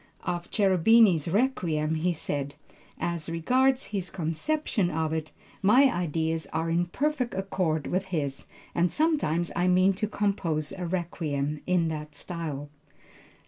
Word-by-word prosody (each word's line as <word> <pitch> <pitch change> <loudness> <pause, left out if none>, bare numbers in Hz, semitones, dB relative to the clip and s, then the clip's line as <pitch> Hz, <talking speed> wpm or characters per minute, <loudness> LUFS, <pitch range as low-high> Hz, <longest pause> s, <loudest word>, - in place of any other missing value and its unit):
Of 175 0 -3
Cherubini's 195 -3 +4
Requiem 165 -7 +1
he 165 +3 +1
said, 145 -3 -3 0.4
"as 170 -2 -3
regards 255 +11 +2
his 190 -3 -1
conception 190 - -1
of 160 -2 -1
it, 160 -1 -3 0.3
my 250 +7 +6
ideas 160 -1 -1
are 165 +1 -1
in 175 +1 +1
perfect 265 - -1
accord 185 -5 -1
with 185 +2 -1
his 150 -7 -3 0.3
and 175 0 +2
sometime 290 - +1
I 175 +1 +2
mean 185 +2 +4
to 215 +3 -2
compose 185 -8 -1
a 185 -2 -5
Requiem 155 -5 -2
in 175 -3 +2
that 150 -1 -6
style." 145 -3 -5
175 Hz, 135 wpm, -27 LUFS, 160-195 Hz, 0.4 s, my